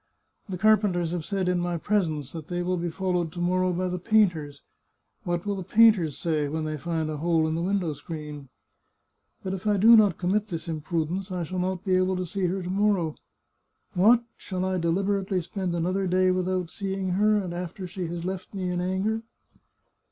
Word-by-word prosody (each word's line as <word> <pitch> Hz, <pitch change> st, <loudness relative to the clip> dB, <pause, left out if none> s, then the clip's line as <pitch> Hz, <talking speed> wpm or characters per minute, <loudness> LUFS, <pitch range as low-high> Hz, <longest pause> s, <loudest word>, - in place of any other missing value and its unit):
" -, -, -35 dB
The 185 Hz, -, -3 dB
carpenters 195 Hz, -4 st, +3 dB
have 170 Hz, -3 st, -3 dB
said 195 Hz, -2 st, -1 dB
in 180 Hz, -1 st, +2 dB
my 175 Hz, 0 st, -1 dB
pres 205 Hz, +1 st, +1 dB
ence 150 Hz, -4 st, -5 dB
that 160 Hz, -2 st, -8 dB
they 175 Hz, 0 st, -2 dB
will 180 Hz, +1 st, 0 dB
be 170 Hz, 0 st, -2 dB
followed 180 Hz, -1 st, -1 dB
to 175 Hz, -, -7 dB
morrow 185 Hz, +1 st, +1 dB
by 180 Hz, +1 st, -1 dB
the 180 Hz, 0 st, -3 dB
painters. 175 Hz, -9 st, +1 dB, 0.6 s
What 175 Hz, +1 st, -1 dB
will 205 Hz, -1 st, -1 dB
the 190 Hz, -, -4 dB
painters 200 Hz, -7 st, +4 dB
say 155 Hz, -3 st, 0 dB
when 155 Hz, +2 st, -3 dB
they 155 Hz, 0 st, -2 dB
find 160 Hz, 0 st, -2 dB
a 155 Hz, -1 st, -3 dB
hole 165 Hz, 0 st, +2 dB
in 160 Hz, -, -1 dB
the 165 Hz, -, -1 dB
win 195 Hz, +3 st, +1 dB
dow 170 Hz, -5 st, -2 dB
screen? 150 Hz, -2 st, -8 dB, 0.9 s
But 190 Hz, -, -3 dB
if 195 Hz, +2 st, -5 dB
I 205 Hz, -1 st, +3 dB
do 225 Hz, +4 st, +8 dB
not 205 Hz, -6 st, +5 dB
commit 200 Hz, +4 st, 0 dB
this 170 Hz, -3 st, -5 dB
imprudence 165 Hz, +4 st, -2 dB
I 180 Hz, -1 st, -2 dB
shall 180 Hz, +3 st, -4 dB
not 185 Hz, +1 st, -2 dB
be 185 Hz, -1 st, +2 dB
able 185 Hz, 0 st, +2 dB
to 185 Hz, 0 st, -2 dB
see 185 Hz, +1 st, -1 dB
her 185 Hz, +1 st, -2 dB
to 175 Hz, -, -5 dB
morrow. 195 Hz, -5 st, +1 dB, 0.8 s
What! 225 Hz, +6 st, +5 dB
shall 185 Hz, -1 st, -3 dB
I 185 Hz, -1 st, 0 dB
deliberately 190 Hz, +3 st, 0 dB
spend 180 Hz, 0 st, -3 dB
another 185 Hz, +3 st, 0 dB
day 185 Hz, +1 st, +3 dB
without 185 Hz, -1 st, -1 dB
seeing 195 Hz, -2 st, -3 dB
her, 210 Hz, +3 st, +3 dB
and 185 Hz, -4 st, -3 dB
after 180 Hz, +2 st, -5 dB
she 180 Hz, -1 st, -5 dB
has 170 Hz, +1 st, -5 dB
left 190 Hz, +1 st, -5 dB
me 185 Hz, -2 st, -2 dB
in 175 Hz, 0 st, -1 dB
anger 190 Hz, +5 st, -1 dB
180 Hz, 210 wpm, -26 LUFS, 170-195 Hz, 0.9 s, do